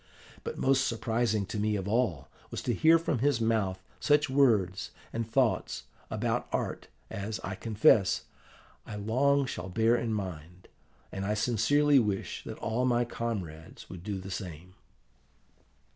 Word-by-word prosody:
But - - -5
most 135 0 +3
surprising 110 -2 0
to 105 - -4
me 105 0 +1
of 95 -1 -3
all 100 - 0 0.2
was - - -5
to - - 0
hear 160 +1 +6
from 160 -6 -1
his 140 -1 +2
mouth 105 -5 0 0.2
such 145 -2 +3
words 105 -9 +3 0.2
and 115 -1 -3
thoughts 125 0 +1 0.3
about - - -1
art - - -2 0.2
as, 105 +2 -4
I - - -4
confess, 105 -3 +3 0.6
I 105 - -8
long 135 +7 +2
shall 95 - -5
bear 110 +5 +3
in 115 -1 -1
mind, 90 -4 -6 0.4
and 95 - -4
I 105 +2 0
sincerely 135 +6 +3
wish 105 -4 -2
that - - -6
all 115 +3 -1
my 120 -1 +2
comrades 95 -10 -5
would 90 -2 -9
do 100 -1 -3
the 95 +1 -7
same. 90 -2 -7
110 Hz, 150 wpm, -30 LUFS, 95-125 Hz, 0.6 s, hear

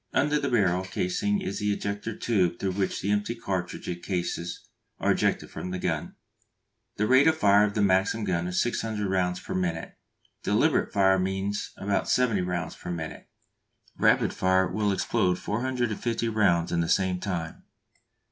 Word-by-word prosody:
Under 150 +2 +2
the - - -1
barrel 95 -6 +2
casing 185 - -1
is 185 - -3
the 105 -1 0
ejector 100 +2 -3
tube 95 -7 +1
through 95 0 -1
which 95 0 -1
the 100 - 0
empty 105 +3 0
cartridge 90 -4 -4
cases 90 -2 -3 0.3
are - - +2
ejected - - 0
from 90 - -6
the 90 - -3
gun. - - -2 0.8
The 105 - +1
rate 130 +6 +5
of 160 0 +4
fire 105 -2 +5
of 105 - -3
the 105 - +2
Maxim 95 +3 +2
gun 90 -3 -1
is 90 0 -1
600 110 -3 -2
rounds 90 -1 0
per - - -6
minute. 85 -3 -2 0.5
Deliberate - - +2
fire 95 -1 +4
means 95 +2 -2
about 100 0 -1
70 115 -6 +2
rounds 90 -2 -3
per - - -9
minute; 80 -3 -6 0.7
rapid - - +3
fire 95 0 +2
will 105 +1 0
explode 95 -2 +1
450 120 0 -1
rounds 95 -6 +2
in 85 - +1
the 80 - -1
same 95 -1 +2
time. 85 -4 -4
100 Hz, 165 wpm, -27 LUFS, 90-110 Hz, 0.8 s, rate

